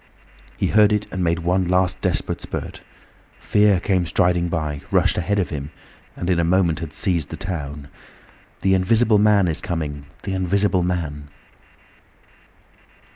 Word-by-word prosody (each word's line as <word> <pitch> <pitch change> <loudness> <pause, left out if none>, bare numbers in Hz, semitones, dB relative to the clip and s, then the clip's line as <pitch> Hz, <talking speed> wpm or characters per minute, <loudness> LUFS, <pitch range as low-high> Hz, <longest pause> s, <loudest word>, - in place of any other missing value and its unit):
He - - 0
heard 105 -1 +4
it 105 0 0
and 95 -1 -2
made 85 -1 +1
one 90 +1 +1
last 90 +1 +1
desperate 90 -5 -1
spurt. - - -6 0.6
Fear 105 -3 +3
came 90 -1 0
striding 90 +1 +2
by, 75 -4 -3
rushed - - +2
ahead 100 +4 -1
of 95 -4 -1
him, 70 -2 -5 0.5
and 85 - -5
in 90 -2 +2
a - - +2
moment 85 -1 +2
had 80 -2 -6
seized 85 -6 -1
the - - -6
town. 75 -7 -5 0.7
"The 95 - +3
Invisible 110 +3 +3
Man 105 -3 +4
is 80 -1 -1
coming! 75 -4 -4 0.2
The 95 - -3
Invisible 95 0 +1
Man!" 80 -5 -3
90 Hz, 150 wpm, -21 LUFS, 80-95 Hz, 0.7 s, heard